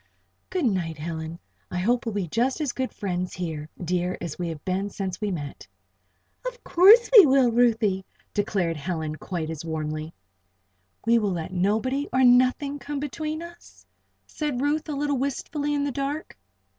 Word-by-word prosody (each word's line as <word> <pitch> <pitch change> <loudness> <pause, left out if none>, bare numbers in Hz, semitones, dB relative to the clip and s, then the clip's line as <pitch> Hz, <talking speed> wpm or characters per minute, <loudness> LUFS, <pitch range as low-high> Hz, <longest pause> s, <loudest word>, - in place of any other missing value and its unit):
"Good 365 -6 -1
night, 175 - 0
Helen. 160 +1 -5 0.3
I 180 - -4
hope 235 +6 +1
we'll 220 - -2
be 195 -4 -1
just 245 - 0
as 295 -5 0
good 260 +1 -3
friends 180 -2 -3
here, 160 -4 -4
dear, 180 +1 -1
as 170 -2 -6
we 175 - -1
have 160 -3 -7
been 190 +2 -1
since 190 -1 -4
we 210 - 0
met." 145 - -6 0.8
"Of - - -6
course 420 +7 +7
we 405 -8 +11
will, 265 -3 +4
Ruthie!" 225 -5 +2 0.3
declared 195 -6 0
Helen, 155 -1 -3
quite 165 -3 -4
as 160 -1 -6
warmly. 155 -1 -3 0.9
"We 230 0 +5
will 205 -3 0
let 170 +1 -4
nobody, 220 +10 0
or 260 0 +3
nothing, 255 +3 +4
come 280 +2 -4
between 310 +3 -4
us?" 340 0 -14 0.4
said 295 -5 -3
Ruth, 295 +3 0
a - - -1
little 285 0 0
wistfully 285 +2 -2
in 285 - 0
the 285 - -1
dark. 280 +4 -3
220 Hz, 170 wpm, -25 LUFS, 175-280 Hz, 0.9 s, we